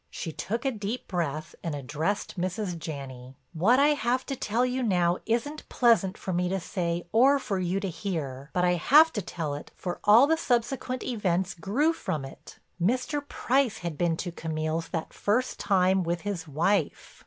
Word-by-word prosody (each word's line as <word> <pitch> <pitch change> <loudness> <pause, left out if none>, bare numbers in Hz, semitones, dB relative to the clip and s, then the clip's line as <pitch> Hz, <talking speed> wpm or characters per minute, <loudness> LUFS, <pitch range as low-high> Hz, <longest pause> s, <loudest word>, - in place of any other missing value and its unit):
She 165 - -5
took 230 - -4
a 270 - +2
deep 215 +2 -4
breath 155 -3 -3
and 165 -3 -2
addressed 150 +9 -2
Mrs. 185 +1 -2
Janney: 135 -5 -7 0.2
"What 195 +10 +4
I 285 +1 +5
have 255 -3 +1
to 275 - -3
tell 240 +1 0
now 190 -9 +1
isn't 265 +7 -2
pleasant 220 -5 +3
for 185 - -4
me 180 +1 0
to 195 +1 0
say 170 -1 -2
or 265 +6 +5
for 205 -8 -2
you 185 +1 0
to 195 - -3
hear, 150 -7 -4
but 180 0 +1
I 180 0 +3
have 310 - +6
to 210 - -1
tell 165 -5 -4
it 145 - -7
for 175 -1 -5
all 220 +6 +7
the 320 +2 +2
subsequent 255 -1 -1
events 190 -6 0
grew 235 - +1
from 150 - -3
it. 135 - -12 0.2
Mr. 255 - +1
Price 250 -4 +1
had 170 -3 -2
been 165 +1 0
to 175 - -4
Camille's 160 0 -3
that 165 -2 -4
first 245 +5 0
time 190 -1 +3
with 170 0 -2
his 190 -5 -4
wife." 170 +8 -1
190 Hz, 180 wpm, -27 LUFS, 165-240 Hz, 0.2 s, all